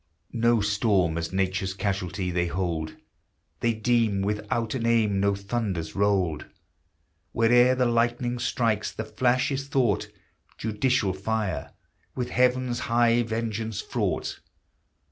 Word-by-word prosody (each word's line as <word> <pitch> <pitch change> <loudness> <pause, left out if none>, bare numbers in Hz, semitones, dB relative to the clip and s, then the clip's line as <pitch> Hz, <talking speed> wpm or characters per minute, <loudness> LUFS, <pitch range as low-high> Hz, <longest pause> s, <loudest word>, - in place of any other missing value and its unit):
No 115 -1 +3
storm 105 -5 +2
as 80 -1 -3
Nature's 95 0 -1
casualty 95 -2 -2
they 90 0 0
hold, 85 -3 -2 0.6
They 115 -1 +1
deem 110 -3 +1
without 105 +2 -1
an 120 -3 -1
aim 110 -4 +2
no 100 0 +2
thunders 100 -6 -3
rolled; 95 -6 +1 0.9
Where'er 120 +2 +5
the 130 0 +2
lightning 120 +1 0
strikes, 115 -4 0
the 110 - -5
flash 125 +5 +1
is 135 0 -3
thought 125 -8 +1 0.5
Judicial 110 -2 0
fire, 100 -1 -3 0.4
with 125 -1 -3
Heaven's 125 -1 +2
high 120 0 +3
vengeance 110 -2 -3
fraught. - - -2
110 Hz, 120 wpm, -26 LUFS, 95-120 Hz, 0.9 s, Where'er